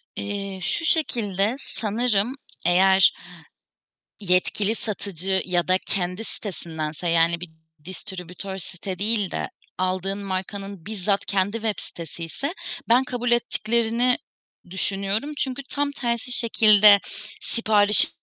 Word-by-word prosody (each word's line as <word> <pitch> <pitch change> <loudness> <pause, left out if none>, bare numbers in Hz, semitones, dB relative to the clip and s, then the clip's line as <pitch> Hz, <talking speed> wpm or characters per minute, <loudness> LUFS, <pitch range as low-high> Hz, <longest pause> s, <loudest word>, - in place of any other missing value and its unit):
Eee, 200 -1 -4
şu 330 - -1
şekilde: 225 - +1
Sanırım 225 0 -1 0.3
eğer 190 +2 +6 1.1
yetkili 195 +2 +1
satıcı 195 -4 -2
ya 175 -1 0
da 185 0 +4
kendi 180 +3 -1
sitesindense 165 -6 -5
yani 165 0 +3
bir 180 -1 -8 0.3
distribütör 185 +1 -7
site 185 +1 -6
değil 205 -2 0
de - - -3 0.3
aldığın 185 +2 -1
markanın 195 -1 -5
bizzat 200 -1 -1
kendi 195 0 +1
websitesiyse 205 - -4 0.4
ben 245 +3 +5
kabul 245 -1 -2
ettiklerini 235 +1 +2 0.5
düşünüyorum. 200 +8 -1
Çünkü 270 -2 -2
tam 285 0 0
tersi 240 -2 -2
şekilde 215 -3 +6 0.4
siparişi 210 -2 +5
200 Hz, 100 wpm, -24 LUFS, 185-225 Hz, 1.1 s, eğer